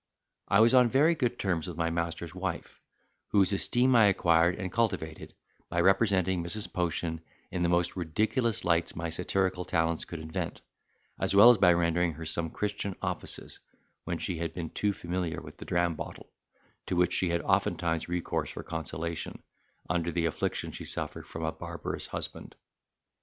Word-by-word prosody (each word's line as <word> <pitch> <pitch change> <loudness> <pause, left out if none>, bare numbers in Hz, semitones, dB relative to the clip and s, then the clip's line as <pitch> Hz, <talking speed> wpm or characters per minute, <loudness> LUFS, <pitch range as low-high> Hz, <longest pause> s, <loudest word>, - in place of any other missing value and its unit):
I 100 - +5
was 115 +2 +5
on 125 -2 +6
very 145 +7 +4
good 125 -6 -1
terms 90 -5 -1
with 85 -3 -6
my 85 0 0
master's 85 0 -3
wife, - - -5 0.5
whose 100 -1 +3
esteem 125 +5 +3
I 115 -2 +7
acquired 85 -2 +3
and 95 -3 -4
cultivated, 90 -9 -2 0.3
by 85 - -1
representing 95 -2 +3
Mrs. 100 +5 -4
Potion 85 -2 -1 0.3
in 90 - -2
the 85 - +2
most 85 0 +1
ridiculous 110 - 0
lights 85 -1 +1
my 85 0 -3
satirical 90 +1 0
talents 80 -1 0
could 85 - -7
invent, 80 0 -4 0.6
as - - +1
well 110 +5 +10
as 115 - +2
by 90 - +7
rendering 85 0 +1
her 80 +2 -8
some 80 +1 -1
Christian 100 +1 -3
offices, - - -5 0.4
when - - -3
she 85 -3 -3
had 80 -1 -3
been 85 -3 -4
too 105 - 0
familiar 90 -2 -3
with - - -12
the - - -9
dram 85 -1 +1
bottle, - - -8 0.6
to - - -1
which 90 0 +3
she 90 - +1
had 85 0 0
oftentimes 80 0 0
recourse 90 0 -2
for - - -7
consolation, 80 0 -4 0.4
under 85 0 0
the 85 0 0
affliction 80 - -2
she - - -7
suffered - - -3
from 80 - -6
a 80 - 0
barbarous - - -6
husband. - - -6
85 Hz, 170 wpm, -29 LUFS, 85-100 Hz, 0.6 s, well